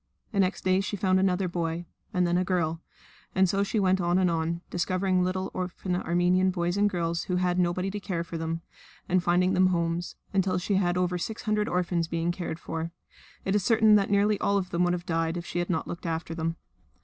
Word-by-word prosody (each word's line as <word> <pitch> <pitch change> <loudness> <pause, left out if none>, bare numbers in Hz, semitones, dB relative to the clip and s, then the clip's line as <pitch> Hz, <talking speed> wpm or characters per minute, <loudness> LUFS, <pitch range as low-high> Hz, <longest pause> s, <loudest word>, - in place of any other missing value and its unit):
The 200 - -1
next 190 0 +1
day 185 +1 +3
she 205 +1 -3
found 185 0 +2
another 190 0 +2
boy, 170 -1 -2 0.3
and 180 -1 +2
then 175 0 +1
a 180 - +2
girl, 170 -3 0 0.5
and 190 0 +5
so 195 +2 +1
she 200 +2 0
went 190 -1 +3
on 175 +1 +2
and 185 -2 +3
on, 165 +1 -1
discovering 185 +1 +1
little 185 +1 -2
orphan 180 0 -3
Armenian 180 +1 +2
boys 175 -1 -1
and 205 0 +3
girls 170 -2 -1
who 180 - -1
had 180 0 +1
nobody 180 +2 0
to 205 - -4
care 175 -4 -3
for 170 - -8
them, 165 0 -3 0.5
and 185 0 +2
finding 180 +1 +2
them 185 0 +4
homes 170 -1 -1 0.2
until 190 -1 +2
she 185 +3 -1
had 175 -2 +1
over 180 0 0
six 220 +5 -4
hundred 215 -2 0
orphans 175 -2 0
being 170 +1 -1
cared 175 -2 -4
for. 165 0 -4 0.6
It 190 - +1
is 205 -2 +2
certain 220 0 +5
that 200 -2 +4
nearly 205 +1 +3
all 200 0 +2
of 185 -2 -3
them 175 +1 +1
would 175 - +2
have 175 0 -4
died 165 0 0
if 170 - -5
she 175 - -3
had 175 - -2
not 165 -3 -1
looked 175 0 -6
after 165 0 -3
them. 165 0 -2
180 Hz, 225 wpm, -27 LUFS, 170-190 Hz, 0.6 s, and